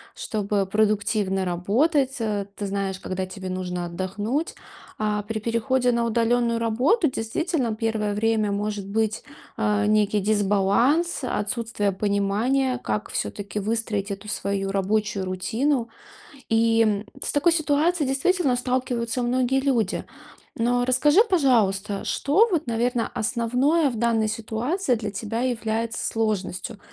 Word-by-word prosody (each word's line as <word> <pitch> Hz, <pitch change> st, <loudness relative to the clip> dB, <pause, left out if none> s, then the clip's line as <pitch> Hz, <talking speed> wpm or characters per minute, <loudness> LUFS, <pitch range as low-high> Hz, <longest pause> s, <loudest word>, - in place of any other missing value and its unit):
чтобы 205 Hz, -2 st, -1 dB
продуктивно 205 Hz, -1 st, +1 dB
работать. 260 Hz, -, +1 dB
А 210 Hz, -2 st, -1 dB
ты 205 Hz, -, -4 dB
знаешь, 195 Hz, -1 st, -2 dB
когда 185 Hz, 0 st, -3 dB
тебе 185 Hz, 0 st, -7 dB
нужно 180 Hz, -1 st, -3 dB
отдохнуть. 205 Hz, -, -3 dB, 0.4 s
А 210 Hz, -1 st, 0 dB
при 220 Hz, +2 st, -4 dB
переходе 240 Hz, +3 st, +1 dB
на 235 Hz, -1 st, +1 dB
удалённую 235 Hz, 0 st, +1 dB
работу 260 Hz, -, +2 dB
действительно 250 Hz, +1 st, -1 dB
первое 220 Hz, -2 st, -1 dB
время 215 Hz, 0 st, +1 dB
может 205 Hz, -1 st, -3 dB
быть, 220 Hz, +1 st, -1 dB, 0.3 s
а, 210 Hz, -2 st, +1 dB
некий 210 Hz, -1 st, +3 dB
дисбаланс, 210 Hz, -, +2 dB
отсутствие 220 Hz, -3 st, -1 dB
понимания, 210 Hz, +7 st, 0 dB
как 210 Hz, -, -2 dB
всё-таки 205 Hz, 0 st, -3 dB
выстроить 215 Hz, -1 st, -2 dB
эту 200 Hz, +2 st, -6 dB
свою 195 Hz, -1 st, -2 dB
рабочую 200 Hz, 0 st, 0 dB
рутину. 230 Hz, +7 st, -1 dB, 0.6 s
И, 225 Hz, 0 st, +3 dB
м, 210 Hz, -1 st, 0 dB, 0.2 s
с -, -, -2 dB
такой 295 Hz, +4 st, +3 dB
ситуацией 315 Hz, 0 st, +1 dB
действительно 275 Hz, +1 st, +2 dB
сталкиваются 250 Hz, -1 st, -1 dB
многие 255 Hz, +2 st, +1 dB
люди. 240 Hz, -8 st, 0 dB, 0.5 s
Но 245 Hz, +1 st, +1 dB
расскажи, 295 Hz, -, +4 dB
пожалуйста, 215 Hz, -, +2 dB
что 330 Hz, +12 st, +3 dB
вот, 325 Hz, -5 st, 0 dB
наверное, 235 Hz, +1 st, 0 dB
основное 250 Hz, +7 st, +1 dB
в 245 Hz, -, -5 dB
данной 225 Hz, -1 st, +2 dB
ситуации 230 Hz, -, -1 dB
для 215 Hz, -2 st, -4 dB
тебя 220 Hz, +3 st, -3 dB
является 230 Hz, -2 st, -2 dB
сложностью? 215 Hz, -1 st, -2 dB
225 Hz, 125 wpm, -24 LUFS, 205-250 Hz, 0.6 s, расскажи